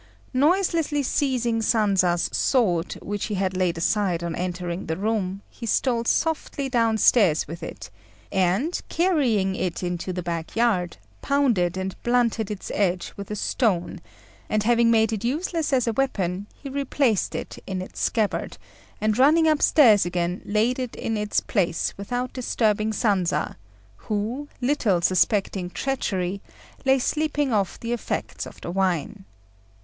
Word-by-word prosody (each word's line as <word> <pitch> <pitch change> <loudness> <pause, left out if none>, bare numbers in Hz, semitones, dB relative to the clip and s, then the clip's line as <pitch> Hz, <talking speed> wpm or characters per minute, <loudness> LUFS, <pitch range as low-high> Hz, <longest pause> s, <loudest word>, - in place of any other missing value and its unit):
Noiselessly 310 0 +2
seizing 245 -4 0
Sanza's 195 -6 +2
sword, 185 -10 +1
which 205 0 -3
he 210 - -3
had 190 -1 -1
laid 180 -2 0
aside 175 -1 0
on 170 -1 -3
entering 180 0 -4
the 160 0 -2
room, 200 -2 -2
he 235 - -9
stole 235 +1 +1
softly 300 -1 0
downstairs 225 - +3
with 165 +3 -8
it, - - -8 0.4
and, 190 - +1
carrying 260 - +2
it 185 -2 -3
into 175 +1 -3
the 180 0 -4
back 170 -1 -4
yard, 205 - +1 0.2
pounded 230 -11 +1
and 190 0 -3
blunted 235 -3 +1
its 210 -2 -6
edge 185 -3 0
with 200 -1 -8
a 210 - -3
stone, 200 -5 0 0.5
and 215 -1 +1
having 235 +1 +4
made 225 -1 +3
it 215 0 -3
useless 310 +4 -1
as 255 -3 +2
a 230 - 0
weapon, 200 -7 -1
he 280 - -10
replaced 270 -5 0
it - - -6
in 190 -1 -3
its 185 - -7
scabbard, 220 -4 -1 0.4
and 215 +2 0
running 315 +5 +5
upstairs 290 -8 +5
again 175 +1 -2
laid 225 +5 +1
it 250 -2 -4
in 225 - -2
its 210 -1 0
place 175 -5 0
without 245 +5 -3
disturbing 220 -4 0
Sanza, 190 -8 0 0.4
who, 220 - -3
little 245 -8 +2
suspecting 185 0 +1
treachery, 195 -6 -2 0.4
lay 265 0 +5
sleeping 295 0 0
off 200 -3 0
the 235 +1 -3
effects 240 - -4
of - - -13
the - - -5
wine. 190 +1 -1
215 Hz, 145 wpm, -24 LUFS, 185-250 Hz, 0.5 s, running